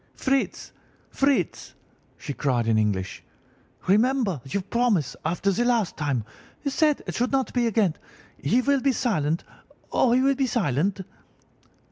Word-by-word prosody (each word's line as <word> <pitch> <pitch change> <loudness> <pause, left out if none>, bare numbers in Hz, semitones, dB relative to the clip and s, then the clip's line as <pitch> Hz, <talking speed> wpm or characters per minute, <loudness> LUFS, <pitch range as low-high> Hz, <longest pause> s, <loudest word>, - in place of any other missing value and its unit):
"'Fritz! 270 0 -1 0.4
Fritz!' 275 0 0 0.4
she 145 - -5
cried 130 -5 0
in 115 -1 +2
English, 100 -3 -1 0.6
'remember 215 - +2
your 185 +9 -2
promise 205 - +1
after 175 +5 0
the 215 +6 +1
last 235 -6 +1
time. 145 -7 -1 0.4
You 280 - -1
said 300 0 +2
it - - -4
should 245 +1 0
not 270 -1 0
be 245 -2 +2
again. 205 -6 +2 0.5
He 235 - +2
will 280 0 +2
be 275 0 +2
silent! 170 - 0 0.5
Oh, 245 - +3
he 250 +2 +4
will 275 +1 +4
be 270 -1 0
silent! 190 - 0
215 Hz, 145 wpm, -25 LUFS, -, 0.6 s, he